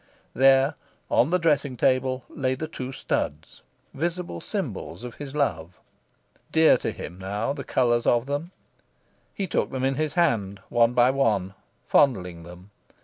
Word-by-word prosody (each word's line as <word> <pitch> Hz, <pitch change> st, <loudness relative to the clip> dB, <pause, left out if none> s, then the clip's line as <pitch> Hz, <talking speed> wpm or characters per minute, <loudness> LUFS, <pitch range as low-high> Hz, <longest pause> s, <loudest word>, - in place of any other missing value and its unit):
There, 135 Hz, +2 st, +5 dB, 0.4 s
on 125 Hz, -, +4 dB
the 180 Hz, -, +3 dB
dressing 145 Hz, -6 st, +1 dB
table, 130 Hz, 0 st, +1 dB
lay 130 Hz, -2 st, -2 dB
the 155 Hz, +4 st, -5 dB
two 130 Hz, -4 st, -6 dB
studs, 80 Hz, -, -3 dB, 0.3 s
visible 170 Hz, -, -3 dB
symbols -, -, -5 dB
of 125 Hz, -1 st, -7 dB
his 145 Hz, -1 st, -8 dB
love. 90 Hz, -, -1 dB, 0.7 s
Dear 160 Hz, 0 st, +6 dB
to -, -, -3 dB
him, 90 Hz, +2 st, -8 dB
now, 105 Hz, +7 st, -2 dB
the 140 Hz, -1 st, -6 dB
colours 120 Hz, -2 st, +1 dB
of 120 Hz, 0 st, +3 dB
them! 145 Hz, +4 st, -3 dB, 0.9 s
He 195 Hz, -, -2 dB
took -, -, -1 dB
them 130 Hz, -1 st, -4 dB
in 135 Hz, +1 st, +2 dB
his 155 Hz, +1 st, -2 dB
hand, 110 Hz, -, +1 dB
one 120 Hz, 0 st, +3 dB
by 125 Hz, +1 st, +5 dB
one, 105 Hz, -9 st, +1 dB, 0.3 s
fondling 90 Hz, -11 st, +2 dB
them. 90 Hz, +4 st, -13 dB
130 Hz, 150 wpm, -25 LUFS, 105-145 Hz, 0.9 s, Dear